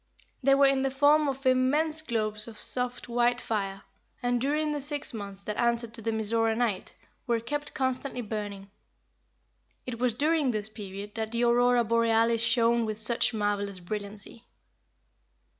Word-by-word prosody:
They 275 +1 +5
were 280 0 +5
in 275 -1 +3
the 270 - +1
form 290 +3 +4
of 270 0 -4
immense 290 +5 +2
globes 215 -6 +3
of 220 -2 -10
soft, 250 0 -2
white 240 0 +2
fire, 195 -4 -3 0.4
and 245 -1 +1
during 300 +3 0
the 295 -1 -3
six 290 -1 -2
months 200 -2 -7
that 210 - -4
answered 235 -1 0
to 230 - -3
the 225 - -2
Mizora 225 +1 +1
night, 230 -6 -1 0.3
were 235 -1 +1
kept 290 +5 -4
constantly 260 -1 -1
burning. 205 -3 -6 1.1
It 240 -2 -5
was 245 -2 +1
during 300 +1 +2
this 215 -2 -2
period 205 -1 -8
that 220 -1 -3
the 235 +1 0
Aurora 240 0 +4
Borealis 230 0 +2
shone 235 0 +3
with 215 -1 -3
such 230 +3 +1
marvelous 205 -3 -2
brilliancy. 205 +4 -6
235 Hz, 160 wpm, -28 LUFS, 215-260 Hz, 1.1 s, They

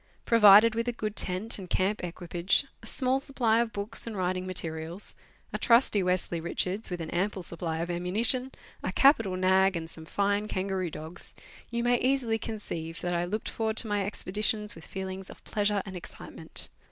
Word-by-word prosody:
Provided 215 0 +7
with 230 +2 -2
a - - +2
good 215 -3 -4
tent 195 +5 +1
and 185 -2 -9
camp 195 +4 0
equipage, 175 +6 +1 0.2
a - - -10
small 260 +1 +1
supply 245 -5 +1
of 235 -1 0
books 210 +3 -3
and 220 -3 -5
writing 185 0 -1
materials, 165 0 -4 0.4
a - - -2
trusty 230 -4 +4
Westly 180 -2 0
Richards 185 +5 -2
with 180 -2 -4
an 160 - -5
ample 190 +1 -1
supply 165 -1 -3
of 170 +2 -2
ammunition, 220 +9 +2 0.3
a - - -2
capital 225 -9 +4
nag, 190 +1 +3
and 160 -1 -5
some 160 -1 -6
fine 200 +4 0
kangaroo 190 -2 -2
dogs, 160 +3 -7 0.3
you 235 0 -2
may 245 0 +3
easily 250 -4 +1
conceive 165 -8 -5
that 175 0 -1
I 175 0 0
looked 210 +5 -3
forward 220 -1 -2
to - - +3
my 205 -1 0
expeditions 210 +2 0
with 165 - -12
feelings 190 0 -6
of - - -13
pleasure 205 -1 0
and 190 -2 -8
excitement. 180 - -4
195 Hz, 180 wpm, -28 LUFS, 180-225 Hz, 0.4 s, Provided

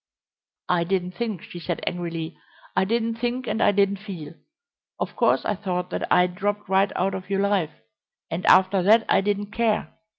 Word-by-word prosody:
"I 175 -1 +2
didn't 180 0 -1
think," 215 -4 -4
she 175 - -9
said 175 0 -4
angrily; 170 -2 -3 0.4
"I - - +3
didn't 230 +2 0
think 245 +2 -2
and 225 - -2
I - - +5
didn't 200 0 +2
feel. 185 -7 -8 0.7
Of - - -3
course - - +2
I - - +1
thought 180 -3 -3
that - - -3
I'd 180 0 +4
dropped 205 +2 -2
right 195 +1 +3
out 195 +2 0
of 185 0 -6
your 195 0 +1
life, 185 -6 -1 0.5
and 170 +3 -3
after 185 +1 +5
that 220 +5 +5
I - - +4
didn't 205 0 -2
care. 225 -1 0
195 Hz, 185 wpm, -24 LUFS, 180-210 Hz, 0.7 s, I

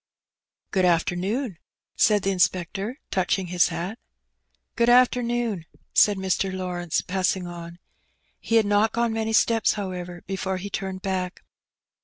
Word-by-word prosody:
"Good 190 - +2
afternoon/^ 180 - 0 0.4
said 210 -2 +3
the 195 - +1
inspector, 185 - 0
touching 185 0 0
his 175 - +4
hat. 190 +8 -4 0.8
"Good 235 -1 +3
afternoon/* 240 -6 +2 0.3
said 205 -2 +5
Mr. 190 0 0
Lawrence, 180 -3 -2
passing 185 0 -1
on. 170 -1 -8 0.6
He 230 - -1
had 225 -2 +5
not 205 +2 +2
gone 235 -1 +1
many 220 0 -1
steps, 225 0 +3
however, 180 -3 -5
before 190 0 -2
he 200 +2 -6
turned 190 -1 -4
back. 185 -1 -3
190 Hz, 130 wpm, -25 LUFS, 180-220 Hz, 0.8 s, said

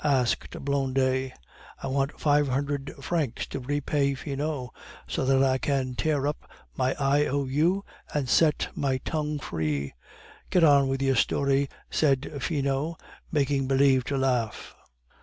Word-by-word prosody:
asked 130 -5 +1 0.2
Blondet. 130 -1 +1 0.5
"I - - -2
want 135 +1 -1
five 145 -1 +3
hundred 140 +1 -2
francs 145 -5 -1
to - - -5
repay 140 +1 0
Finot, 140 -2 -4 0.3
so - - -1
that 135 0 +4
I 130 -1 +2
can 135 -2 -1
tear 145 +1 0
up 150 +1 -3 0.3
my 130 0 0
I. 145 +1 +3
O. 140 +1 0
U. 165 +9 +1 0.3
and 145 -3 -1
set 155 +2 +3
my 135 -2 0
tongue 150 -2 -1
free." 75 - -2 0.6
"Get 180 - +3
on 140 -3 +6
with 135 0 -1
your 135 0 +3
story," 140 +2 +2 0.2
said 140 -3 +1
Finot, 145 +1 -1 0.3
making 140 -3 +1
believe 135 -1 +4
to 140 - -1
laugh. 125 -5 -1
140 Hz, 140 wpm, -27 LUFS, 130-145 Hz, 0.6 s, on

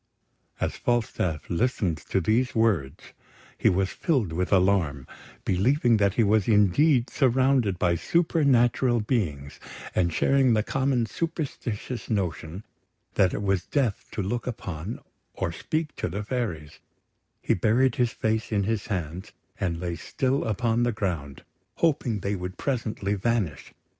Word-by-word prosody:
As - - -2
Falstaff 95 -10 -1
listened 90 -4 0
to 95 - +2
these 115 +8 +1
words, 100 -13 0 0.4
he - - +3
was 95 +1 +1
filled 125 - 0
with 90 +3 -1
alarm, 90 -8 +2 0.4
believing 120 - +3
that 100 -1 +2
he 115 - +4
was 105 -1 +2
indeed 115 - +4
surrounded 130 - +2
by 85 -1 +2
supernatural 130 - +2
beings; 85 - -2 0.3
and 85 -2 +1
sharing 135 +6 +3
the 105 - +2
common 130 -1 0
superstitious 130 -6 -4
notion 90 -2 -2 0.5
that 95 -3 +3
it 100 - -3
was 95 -3 0
death 130 -8 -1
to 105 - -2
look 120 +6 -3
upon 95 -4 -5 0.4
or - - -2
speak 155 - -3
to - - -2
the 100 +5 -4
fairies, 100 - -4 0.6
he - - +1
buried 115 +6 +2
his 120 -2 +2
face 110 +1 -1
in 100 -2 +1
his 110 0 -2
hands, 90 -2 -4 0.3
and 85 -3 -1
lay 85 -1 -3
still 130 +9 -1
upon 115 +2 0
the 120 0 +2
ground, 85 - -4 0.3
hoping 130 -10 +1
they 100 - -1
would 90 0 -6
presently 110 -7 -2
vanish. 105 -5 -1
105 Hz, 140 wpm, -26 LUFS, 90-125 Hz, 0.6 s, he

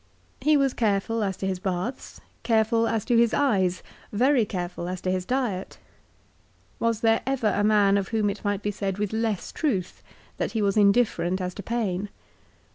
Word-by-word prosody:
He 305 0 +4
was 275 -2 +2
careful 220 0 0
as 190 -2 -2
to - - -4
his 190 -1 -2
baths, 190 +7 -4 0.2
careful 225 0 +2
as 225 -2 -1
to 240 - +2
his 230 0 +4
eyes, 190 -10 +1 0.3
very 245 +2 +3
careful 175 -2 -4
as 185 0 -4
to 185 - -1
his 185 -1 -2
diet. 240 -8 -2 1.0
Was 230 -1 0
there 225 -1 +3
ever 255 -5 +1
a 205 - +1
man 205 -2 +4
of 195 - -4
whom 220 -2 0
it 200 - -9
might 205 -1 -1
be 205 - 0
said 195 -1 -3
with 210 0 -2
less 220 -3 -1
truth 205 - -2 0.4
that - - -2
he 220 - 0
was 200 -1 +1
indifferent 200 -4 +3
as 180 -1 -3
to 200 - -7
pain 205 -3 -2
210 Hz, 185 wpm, -25 LUFS, 190-230 Hz, 1.0 s, He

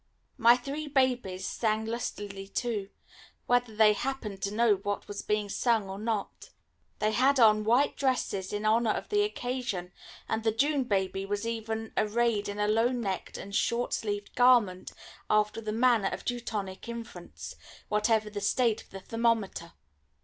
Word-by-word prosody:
My 235 +1 +7
three 280 +4 -5
babies 245 -9 0
sang 220 -1 0
lustily 205 -4 -5
too, 210 -3 -2 0.6
whether 245 -2 +1
they 215 -1 +6
happened 215 -5 -4
to 200 - -1
know 215 -1 +3
what 205 +1 -4
was 205 0 -5
being 210 -1 -1
sung 220 0 +1
or 190 +1 -6
not. 215 -2 -3 0.5
They 215 - +1
had 265 +5 +3
on 215 -2 +6
white 245 +6 +2
dresses 245 -8 -1
in 205 +1 -3
honour 225 +1 +3
of - - -5
the 415 -1 +3
occasion, 245 - -3 0.4
and 220 0 -1
the 225 - +3
June 275 +4 +1
baby 195 -3 0
was 205 +2 -3
even 225 -1 -4
arrayed 215 -1 +1
in 205 - -5
a 210 0 +1
low 225 +2 +3
necked 230 -7 -3
and 200 +1 -7
short 240 +2 0
sleeved 205 -2 -3
garment, 240 -7 +4 0.4
after 215 +1 +2
the 215 -1 -3
manner 230 -3 +3
of - - -6
Teutonic 220 -5 -4
infants, 235 0 -8 0.3
whatever 210 0 +1
the 205 -1 -4
state 225 +2 +1
of - - -20
the 195 - -9
thermometer. 225 -7 -1
220 Hz, 160 wpm, -29 LUFS, 205-240 Hz, 0.6 s, My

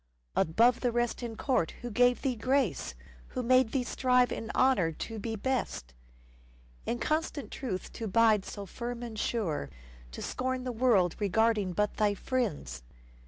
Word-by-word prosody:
Above 230 +9 +4
the 245 - +1
rest 240 +1 -1
in 235 -2 -5
court 235 - 0
who 240 - -4
gave 245 +3 +3
thee 265 -3 +1
grace? 230 - 0 0.3
Who 255 - -4
made 255 -1 +4
thee 265 - 0
strive 250 0 +2
in 225 - -4
honour 255 -11 +3
to 225 +7 -6
be 225 +1 -3
best? 220 - -2 0.9
In 240 - 0
constant 305 -3 -2
truth 210 -9 -4
to 225 - -4
bide 215 0 +4
so 200 0 -7
firm 240 +5 -5
and 225 -3 -6
sure, 170 - -1 0.4
To - - -6
scorn 260 0 -2
the 255 - -2
world 220 -8 +3
regarding 210 -1 +2
but 210 +3 0
thy 210 -2 +2
friends 185 - -2
230 Hz, 160 wpm, -30 LUFS, 205-250 Hz, 0.9 s, Above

